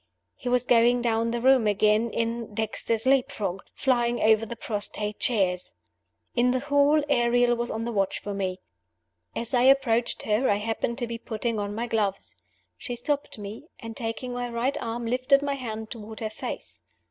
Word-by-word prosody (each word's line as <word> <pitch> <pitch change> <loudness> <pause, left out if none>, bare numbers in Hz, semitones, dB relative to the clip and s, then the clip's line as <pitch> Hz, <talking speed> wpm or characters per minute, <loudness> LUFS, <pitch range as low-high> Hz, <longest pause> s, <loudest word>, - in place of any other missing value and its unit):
He 250 - -5
was 250 0 +2
going 240 0 +4
down 230 -1 +1
the 235 0 -2
room 260 -3 +5
again, 210 +2 +3
in 230 -1 -3
"Dexter's 220 +1 -1
Leap 270 +1 +3
frog," 195 -6 -3
flying 240 -2 +1
over 220 +1 +4
the 235 - -6
prostrate 210 -1 -4
chairs. 185 -6 0 0.6
In 245 0 +3
the 255 +1 +2
hall, 285 +2 +3
Ariel 240 -2 +3
was 235 0 -2
on 225 +1 -3
the 235 - -2
watch 195 -3 0
for 205 - -5
me. 190 -2 -2 0.8
As 235 +3 -2
I 245 - +4
approached 255 -3 +3
her, 220 +5 +1
I 205 - +4
happened 225 +3 -2
to 245 - -2
be 230 0 -5
putting 225 -1 -3
on 205 0 -3
my 230 +2 -2
gloves. 210 -4 -2 0.4
She 245 - -5
stopped 285 +3 -2
me; 210 +8 -8
and, 225 -1 -8
taking 245 +1 -4
my 245 0 -3
right 240 +4 -1
arm, 230 +1 -3
lifted 255 +4 +3
my 285 -1 0
hand 220 -5 -5
toward 220 -1 -8
her 220 -1 -3
face. - - -7
235 Hz, 180 wpm, -26 LUFS, 215-250 Hz, 0.8 s, room